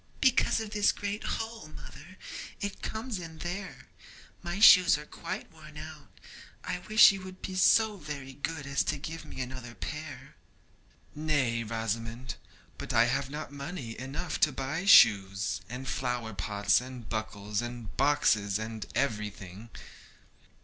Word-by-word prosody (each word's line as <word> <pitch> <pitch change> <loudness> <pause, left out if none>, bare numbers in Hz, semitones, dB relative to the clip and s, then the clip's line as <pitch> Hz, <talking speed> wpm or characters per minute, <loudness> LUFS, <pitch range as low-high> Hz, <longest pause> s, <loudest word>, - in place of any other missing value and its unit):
'Because 260 -3 +3
of 220 -2 -5
this 210 -1 +3
great 205 +1 -4
hole, 225 -4 -4
mother; 180 +4 -12 0.4
it 205 -1 -4
comes 220 -2 -4
in 165 -2 -9
there. 180 +4 -6 0.6
My 175 +2 -4
shoes 185 -6 +8
are 150 - -9
quite - - -6
worn 155 -1 -13
out. 155 -1 -9 0.5
I 180 - -3
wish 215 +4 +7
you 195 -1 -6
would 185 0 -11
be 190 - -4
so 210 +3 +4
very 145 -5 -7
good 145 +2 -4
as 140 0 +1
to - - -1
give 160 +3 -7
me - - -9
another 125 -2 -7
pair.' 150 -2 -7 0.8
'Nay, 145 -7 0
Rosamond, 115 +2 -3 0.5
but - - -4
I 115 - +6
have 135 +2 0
not 150 0 -6
money 140 -5 -6
enough 140 +7 -4
to 150 - +4
buy 140 +7 -3
shoes, 100 - +6
and 125 +3 -6
flower 125 -4 -2
pots, 100 +3 +1
and 125 -3 -9
buckles, 105 -1 -3
and 120 -2 -7
boxes, 110 -8 +3
and 110 -1 -5
everything.' 105 -4 -3
140 Hz, 145 wpm, -30 LUFS, 115-175 Hz, 0.8 s, shoes